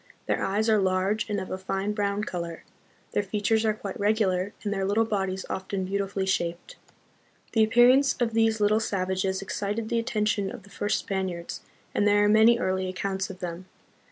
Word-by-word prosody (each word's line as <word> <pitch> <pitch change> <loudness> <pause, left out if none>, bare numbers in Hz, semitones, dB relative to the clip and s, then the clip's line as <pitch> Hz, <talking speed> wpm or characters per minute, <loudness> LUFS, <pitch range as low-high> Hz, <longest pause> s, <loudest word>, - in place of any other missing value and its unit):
Their - - 0
eyes 210 +3 0
are 220 -1 +4
large 190 +3 0
and 205 -1 0
of 190 - -6
a 185 - -3
fine 195 +2 -2
brown 205 0 -1
color, 170 -4 -5 0.5
their - - +1
fea 205 +1 -3
tures 220 +2 +2
are 215 -1 +2
quite 200 -2 -7
regular, 200 -2 +1
and 205 -1 -1
their 195 -1 -1
little 205 +4 +2
bodies 190 -3 -2
often 190 0 -3
beau 195 +2 -1
tifully 195 0 -3
shaped. 170 -2 -2 0.8
The 225 - +4
appearance 245 +5 +5
of 235 -2 0
these 225 -1 +2
little 210 +1 +3
savages 190 -2 -1
excited 210 +3 -3
the 235 - +1
attention 215 -4 0
of - - -9
the 200 - -17
first 205 +1 0
Spaniards, 185 -3 -4 0.3
and 205 - +2
there 205 0 +4
are - - +4
many 220 +2 +6
early 190 -4 -1
accounts 190 +1 -3
of 190 0 -9
them. 175 +1 -5
200 Hz, 190 wpm, -27 LUFS, 190-215 Hz, 0.8 s, many